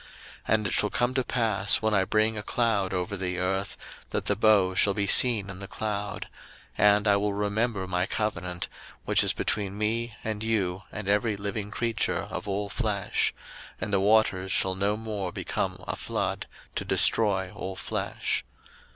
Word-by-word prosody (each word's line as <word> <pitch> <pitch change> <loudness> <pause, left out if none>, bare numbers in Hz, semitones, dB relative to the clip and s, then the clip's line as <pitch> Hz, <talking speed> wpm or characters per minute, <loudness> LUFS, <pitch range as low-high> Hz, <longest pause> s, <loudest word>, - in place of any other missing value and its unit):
01:009:014 - - -18 0.5
And 110 -1 -1
it - - -2
shall 105 - +3
come 120 +3 0
to 130 -1 +1
pass, 110 -5 +2
when 110 0 +2
I 95 -2 +3
bring 110 +2 +2
a 105 - -3
cloud 105 -4 0
over 90 +2 -2
the 90 -2 -3
earth, 95 +2 -1 0.3
that - - -2
the 105 - +2
bow 100 -3 +4
shall 100 +2 +3
be 100 -2 0
seen 110 -1 +5
in 95 -1 -8
the 100 - -7
cloud: 105 -1 -4 0.5
01:009:015 - - +4
And 105 +1 +2
I 100 -1 +5
will 100 0 0
remember 105 0 -1
my 90 0 0
covenant, 90 -5 -2 0.4
which - - +4
is - - +2
between 100 -1 -2
me 115 +2 -1
and 110 -1 -3
you 100 -5 0
and 110 -2 -6
every 105 +1 +1
living 100 +1 -4
creature 115 +1 -1
of - - -5
all 100 +1 -2
flesh; 105 -2 0 0.5
and 105 - -4
the 100 - +4
waters 100 -2 +2
shall 95 0 +3
no 100 +3 0
more 105 -4 -4
become - - -3
a - - -2
flood - - -3 0.3
to - - -2
destroy 95 -4 +3
all 95 -2 -6
flesh. - - -2
105 Hz, 180 wpm, -27 LUFS, 95-110 Hz, 0.5 s, seen